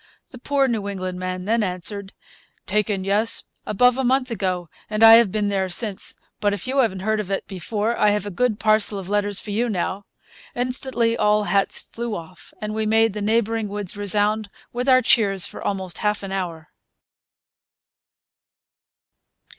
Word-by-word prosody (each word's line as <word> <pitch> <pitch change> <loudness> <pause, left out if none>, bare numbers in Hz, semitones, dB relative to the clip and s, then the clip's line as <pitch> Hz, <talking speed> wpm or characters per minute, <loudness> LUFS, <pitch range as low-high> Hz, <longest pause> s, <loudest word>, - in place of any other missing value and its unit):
The 250 - -11
poor 275 +1 +1
New 220 -5 -2
England 185 -2 -4
man 185 0 -4
then 225 +2 +1
answered: 195 +1 -3 0.5
'Taken, 205 -1 0
yes, 205 +4 +1 0.2
above 250 +5 +3
a - - +1
month 255 0 +1
ago; 185 -5 -2 0.2
and 215 +1 0
I 225 0 +10
have 230 -5 +3
been 210 0 0
there 190 -2 -1
since; 200 +1 +1 0.2
but 205 -1 +1
if - - -7
you 265 +2 0
haven't 190 -7 +1
heard 215 +2 0
of 205 -3 -4
it 195 - -2
before, 205 +4 -2
I 210 - +3
have 205 -1 0
a 205 - -5
good 225 +2 0
parcel 215 -1 +2
of 190 -1 -7
letters 205 -1 0
for 210 - -7
you 235 +4 0
now.' 195 0 -3 0.5
Instantly 245 -2 -1
all 210 -1 +2
hats 200 -1 +1
flew 235 -2 -5
off, 170 +2 -11
and 210 0 -4
we 220 0 -1
made 225 0 +3
the 210 - -5
neighbouring 225 +1 0
woods 205 -2 -4
resound 205 +1 +1 0.2
with 250 +2 -1
our 255 -1 +5
cheers 195 -5 +4
for - - -7
almost 190 -3 -3
half 210 -1 -1
an 195 - -6
hour. 170 -5 -4
210 Hz, 175 wpm, -22 LUFS, 195-225 Hz, 0.5 s, I